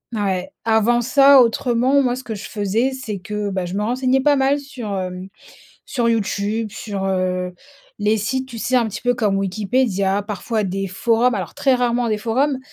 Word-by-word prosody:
heu, - - -2
ouais, 185 -2 -1
avant 225 +2 +3
ça 275 +2 +6
autrement 245 +3 +2
moi 250 -2 +1
ce 260 - -8
que 220 -3 -5
je 215 +2 -7
faisais, 220 +5 0
c'est 255 -6 -5
que, 210 +1 -4
bah, 185 -2 -2
je 175 - -6
me 205 - -1
renseignais 255 +3 +1
pas 290 +1 +4
mal 270 +1 +2
sur, 260 -8 -6
hem, 185 0 -5 0.6
sur 240 -4 0
YouTube, 215 0 -1
sur, 200 -2 -5
heu, 185 -1 -1 0.5
les 210 +1 +2
sites, 260 +5 -2
tu 235 -3 -8
sais? 255 +3 0
Un 240 -2 +3
petit 210 0 -6
peu 245 0 +1
comme 210 -5 0
Wikipédia, 200 0 0
parfois 215 +2 -3
des 195 +1 -2
forums, 230 +6 +1
alors 185 -5 -4
très 270 -2 +2
rarement 245 -1 +1
des 215 -1 0
forums 260 +6 0
225 Hz, 195 wpm, -20 LUFS, 200-250 Hz, 0.6 s, ça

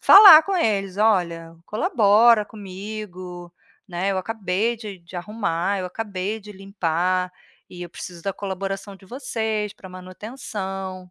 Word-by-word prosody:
falar 390 -6 +10
com 390 -1 -1
eles: 195 - 0
"Olha, 170 -6 +1
colabora 220 - +4
comigo, 190 -3 -8 0.4
né, 185 +2 -1
eu 190 - -1
acabei 220 +2 -1
de 210 -4 -8
de 175 +1 -11
arrumar, 195 -1 -2
eu 180 - -3
acabei 200 +1 -4
de 210 -1 -12
limpar, 185 -2 -1 0.4
e 175 -1 -9
eu 175 - -8
preciso 175 -2 -9
da 195 - -2
colaboração 195 +1 -5
de 190 - -17
vocês 220 -4 -3
para 190 - -13
manutenção.". 190 -1 -7
195 Hz, 135 wpm, -23 LUFS, 185-215 Hz, 0.4 s, falar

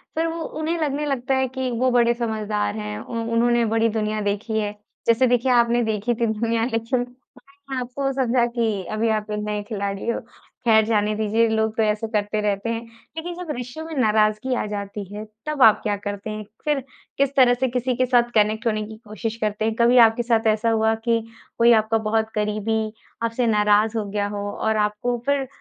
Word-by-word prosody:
फिर 325 +1 +1
वो 330 0 -4 0.2
उन्हें 325 +2 -1
लगने 295 0 -1
लगता 270 -2 0
है 265 0 +1
कि 260 -1 -1
वो 255 0 +3
बड़े 240 -1 +4
समझदार 215 -3 -2
हैं। 210 0 -4
उ 235 - -8 0.2
उन्होंने 235 0 +3
बड़ी 225 0 +3
दुनिया 215 -1 -1
देखी 210 +2 -1
है, 205 -1 -1 0.4
जैसे 235 +3 +4
देखिए 245 +1 +2
आपने 240 0 +4
देखी 220 +1 0
थी 230 +1 0
दुनिया 225 +1 0
लेकिन 230 +1 -1
मैंने 265 +2 -8
आपको 265 +2 -2
समझा 250 -2 +2
कि 220 -5 0
अभी 220 +1 0
आप 210 0 -6
एक 210 - -2
नए 210 0 -2
खिलाड़ी 200 -1 -4
हो, - - 0 0.5
खैर 220 -2 +5
जाने 215 -1 +1
दीजिए 220 +2 +2
लोग 220 0 0
तो 225 - +3
ऐसे 215 +1 0
करते 210 -1 -1
रहते 205 +2 -1
हैं। 230 0 -2 0.4
लेकिन 345 +2 -4
जब 320 - -5
रिश्तों 250 +6 -6
में 325 - -7
नाराज़गी 215 +3 +2
आ - - -1
जाती 205 0 -5
है, 210 +1 -6 0.2
तब 300 -3 -2
आप 220 - +7
क्या 205 -2 0
करते 205 +1 -4
हैं? 215 0 -5 0.2
फिर, 295 -3 +1 0.3
किस 275 0 +1
तरह 250 -2 +6
से 260 +2 0
किसी 250 0 -1
के 255 - +2
साथ 240 -1 +2
कनेक्ट 215 +2 +2
होने 215 -1 0
की 220 0 -10
कोशिश 220 +1 -4
करते 215 0 -1
हैं 225 - +1
कभी 245 +2 +5
आपके 225 +2 -2
साथ 225 -2 +2
ऐसा 225 +2 0
हुआ 220 0 +2
कि 230 -1 +3 0.4
कोई 235 0 +6
आपका 225 +1 0
बहुत 220 0 +1
करीबी 215 +1 -1 0.3
आपसे 230 +1 0
नाराज़ 210 +1 +3
हो 215 - -1
गया 205 0 -1
हो 205 0 -4
और 220 0 -1
आपको 240 +4 -3
फिर 280 -2 +1
225 Hz, 205 wpm, -23 LUFS, 215-245 Hz, 0.5 s, आप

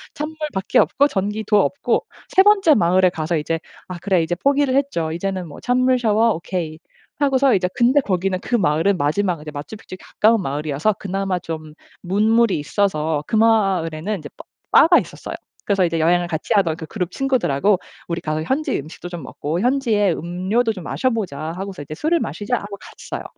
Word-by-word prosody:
찬물밖에 300 -9 -1
없고 285 - +3
전기도 210 -2 +1
없고 280 - 0 0.3
3 380 - +5
번째 395 -5 +5
마을에 185 -4 +4
가서 165 -1 -2
이제 165 +2 -2 0.3
아 180 - -6
그래 185 -3 +2
이제 160 - -2
포기를 280 +6 +1
했죠. 270 - 0
이제는 185 +1 -3
뭐 145 - -11
'찬물 255 +1 +2
샤워 225 0 +3
오케이.' 165 -2 -4 0.4
하고서 270 -2 +3
이제 180 -1 +1
근데 255 +4 +4
거기는 190 -4 -1
그 245 - -1
마을은 180 0 +2
마지막 170 +4 0
이제 150 0 -8
마추픽쪽에 185 +6 -9
가까운 220 0 +2
마을이어서 150 +5 -1
그나마 195 -1 -2
좀 155 -3 -7 0.3
문물이 215 +4 +2
있어서 155 -2 0
그 - - -1
마을에는 195 -5 +2
이제 150 -4 -9
바 - - -12 0.3
바가 340 +2 +7
있었어요. - - -7 0.3
그래서 195 -2 +2
이제 165 -1 -1
여행을 175 +2 +2
같이 160 -2 -2
하던 180 -6 +2
그 160 - -8
그룹 180 0 -4
친구들하고 210 - +1 0.3
"우리 170 0 -3
가서 155 -1 -2
현지 275 - -1
음식도 160 +4 -9
좀 175 -4 -7
먹고 155 +6 -4
현지의 230 -7 +2
음료도 185 +9 -1
좀 185 -4 -9
마셔 255 +9 0
보자." 200 - -3 0.2
하고서 190 -2 -6
이제 145 +2 -7
"술을 330 - +1
마시자." 230 -1 -2
하고 200 -1 -7
갔어요. - - -8
190 Hz, 400 characters per minute, -20 LUFS, 165-230 Hz, 0.4 s, 바가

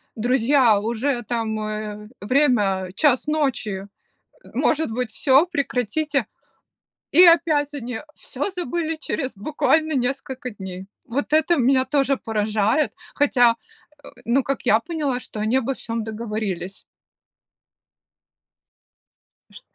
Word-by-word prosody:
"Друзья, 245 -1 +3
уже 235 +4 -1
там, 225 -1 -2
э, 215 0 -5
время 205 -6 +2
час 290 -3 +2
ночи. 240 -10 -1 0.7
Может 315 -4 +1
быть 240 0 -3
всё, 270 +7 +4
прекратите?". 280 - -1 0.9
И 345 - +8
опять 310 -4 +4
они 245 -4 -5 0.2
всё - - -4
забыли 340 -2 -3
через, 270 -6 -4
буквально, 310 +7 +1
несколько 260 -1 -2
дней. 190 -3 -8 0.2
Вот 270 +5 -3
это 315 +3 +4
меня 260 0 +3
тоже 275 0 +1
поражает, 220 +5 0 0.2
хотя, 245 -5 +4 0.5
э, - - -10 0.2
ну, 245 +4 +2
как 275 +1 -3
я 220 +2 +5
поняла, 290 -5 -2
что 215 - -8
они 220 +4 +1
обо 265 +1 -1
всём 230 -1 -4
договорились. 210 -4 -4 2.7
Ш - - -11
250 Hz, 110 wpm, -22 LUFS, 220-290 Hz, 2.7 s, И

